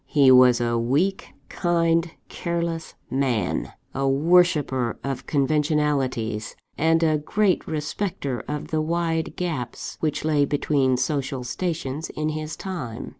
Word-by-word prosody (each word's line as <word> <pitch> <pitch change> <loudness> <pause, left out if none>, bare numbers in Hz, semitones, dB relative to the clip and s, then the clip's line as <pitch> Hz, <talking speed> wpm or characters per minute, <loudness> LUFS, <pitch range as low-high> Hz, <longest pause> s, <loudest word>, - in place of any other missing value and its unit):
He 140 -4 +5
was 125 -1 +7
a 120 -1 0
weak, 145 +12 0 0.2
kind, 170 -1 +1 0.2
careless 170 -1 -3 0.2
man; 130 -5 0 0.2
a 135 0 0
worshipper 145 -5 +3
of 135 -2 -4
conventionalities; 140 -6 0 0.2
and 165 +1 +2
a 155 -2 +3
great 200 +5 +1
respecter 150 - -3
of 150 0 -4
the 155 -1 0
wide 165 0 -1
gaps 155 -10 -4
which 155 -1 -1
lay 150 -2 +3
between 140 -2 +1
social 135 -1 -1
stations 155 +1 -3
in 155 0 -2
his 155 0 -4
time. 130 -12 -5
150 Hz, 125 wpm, -24 LUFS, 130-165 Hz, 0.2 s, was